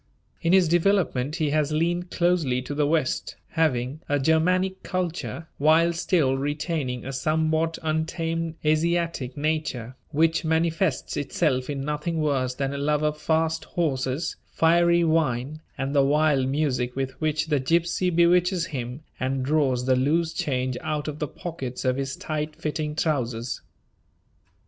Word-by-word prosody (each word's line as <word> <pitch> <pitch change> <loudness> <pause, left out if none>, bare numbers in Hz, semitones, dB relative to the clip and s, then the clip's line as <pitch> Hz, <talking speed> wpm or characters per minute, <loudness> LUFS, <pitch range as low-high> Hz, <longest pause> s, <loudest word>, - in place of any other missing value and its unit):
In 165 - +1
his 185 -2 +5
development 170 -6 +2
he 155 -4 0
has 155 0 +1
leaned 175 +3 0
closely 170 -9 +1
to 145 - -5
the 145 0 +1
west, 155 -3 0
having 145 -3 0
a 145 - +3
Germanic 180 +6 +2
culture 175 -2 -3
while 160 +3 +4
still 165 -5 +2
retaining 145 -2 -2
a 135 - -5
somewhat 160 +3 0
untamed 165 +1 -1
Asiatic 160 -4 0
nature, 145 -5 -2
which 160 +3 +2
manifests 160 0 0
itself 140 -2 0
in 140 -2 -2
nothing 150 +3 -2
worse 135 -4 0
than 135 +1 -2
a 140 - -4
love 150 +1 +1
of 150 0 -1
fast 160 0 +1
horses, 140 -1 -1
fiery 170 +1 +4
wine, 155 -3 0 0.2
and 135 +1 -2
the 140 - +6
wild 145 -2 +3
music 130 -3 0
with 135 0 -2
which 155 -1 +1
the 145 -3 +2
gypsy 170 +6 +1
bewitches 175 +1 +3
him, 125 +3 -5 0.2
and 130 0 -1
draws 135 -4 +1
the 130 0 +3
loose 160 +6 +1
change 130 -2 -1
out 150 -1 -2
of 150 0 -5
the 150 - -1
pockets 135 -6 -6
of 130 0 +2
his 135 +1 -3
tight 155 0 -4
fitting 150 -1 -3
trousers. 125 -7 -1
155 Hz, 145 wpm, -25 LUFS, 135-165 Hz, 0.2 s, the